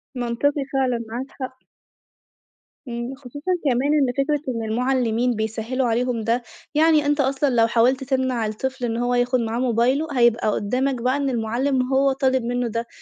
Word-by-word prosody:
منطقي 250 +4 0
فعلًا، 250 -3 0
معاك 245 +3 -4
حق. 260 -1 -7 1.3
امم، 240 +2 -4
خصوصًا 285 +6 -6
كمان 270 +3 +2
إن 275 -5 +2
فكرة 290 +1 +1
إن 230 - -3
المعلِّمين 245 0 +1
بيسهِّلوا 225 +4 -2
عليهم 235 0 0
ده، 235 +2 0 0.3
يعني 310 -1 +4
أنتَ 290 +1 +1
أصلًا 275 +1 +1
لو 230 -3 +3
حاوَلت 245 +3 +2
تمنَع 260 -3 0
الطفل 250 +4 -3
إن 230 -1 -2
هو 245 +1 0
ياخُد 245 +1 +2
معاه 230 0 -2
موبايله، 255 +5 +1
هيبقى 235 -2 +3
قُدَّامك 250 +5 -1
بقى 255 +3 +1
إن 280 -1 0
المعلِّم 255 +3 0
هو 275 +1 +4
طالِب 260 -2 +1
منه 245 +1 -1
ده، 230 +1 -3
250 Hz, 160 wpm, -22 LUFS, 235-270 Hz, 1.3 s, يعني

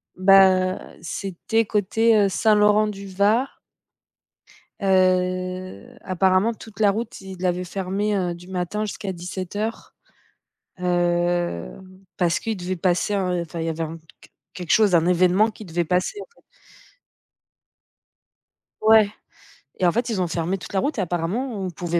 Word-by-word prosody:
Ben, 185 -1 +4
c'était 195 +6 -2
côté, 220 +2 +2
heu, 200 -1 +3
Saint-Laurent-du-Var? 210 +2 +2 1.2
Heu, 185 - 0
apparemment 185 +4 +2
toute 220 -1 -14
la 205 -2 +4
route, 225 +4 -5
ils 190 -1 -9
l'avaient 180 0 -1
fermé, 195 +3 -2
heu, 180 -2 -1
du 175 +1 -12
matin 190 +3 -3
jusqu'à 205 -1 -5
17:00. 185 +5 -5 0.9
Heu, 175 - 0 0.5
parce 175 -1 +2
qu'ils 225 -3 -3
devaient 185 +1 -3
passer, 180 +4 0
heu 180 -3 0
enfin 170 0 -6
il 165 - -2
y - - -1
avait 160 - -6
un 160 +1 -7 0.2
qu - - -18 0.2
quelque 180 -3 -8
chose, 210 -4 +4
un 170 0 +4
événement 185 +4 +3
qui 215 - -12
devait 175 -1 -2
passer, 180 - -1
en - - -9
fait. - - -26 2.4
Ouais 215 -1 +6 0.7
et 185 - +2
en - - +4
fait 235 +4 -1
ils 200 -5 -1
ont 175 - 0
fermé 170 +3 -2
toute - - -10
la 190 - +2
route 285 +4 -1
et - - +2
apparemment 180 +9 -2
on 190 - -3
pouvait 170 0 -2
185 Hz, 145 wpm, -23 LUFS, 175-210 Hz, 2.4 s, Ouais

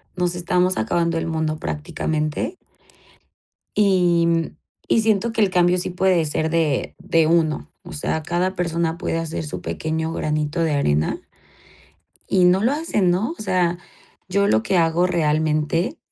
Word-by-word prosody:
nos 180 -1 -1
estamos 180 +1 +1
acabando 170 +8 0
el 165 - -2
mundo 160 -1 -1
prácticamente 155 - -3 1.2
y 180 -4 +3
mm, 165 -1 0 0.3
y 225 - +3
siento 220 +1 +1
que 225 - -1
el 205 - +4
cambio 180 0 +3
sí 180 - -2
puede 180 -2 +2
ser 155 +1 -1
de 160 -4 0
de 165 -3 +2
uno. 160 -2 +1
O - - -10
sea, 155 +1 -2
cada 175 +4 -1
persona 170 -2 -1
puede 165 - -2
hacer 165 -1 -3
su 150 - -6
pequeño 160 0 -3
granito 155 +2 -1
de 160 -2 +1
arena 75 - 0 1.1
y 185 -2 +4
no 185 +3 +4
lo 240 - +3
hacen, 290 - 0
¿no? 210 - 0
O - - -5
sea, 180 -3 0 0.5
yo 200 +2 +2
lo 110 - +3
que 180 - +1
hago 165 +1 +2
realmente, 155 - 0
170 Hz, 155 wpm, -21 LUFS, 160-185 Hz, 1.2 s, el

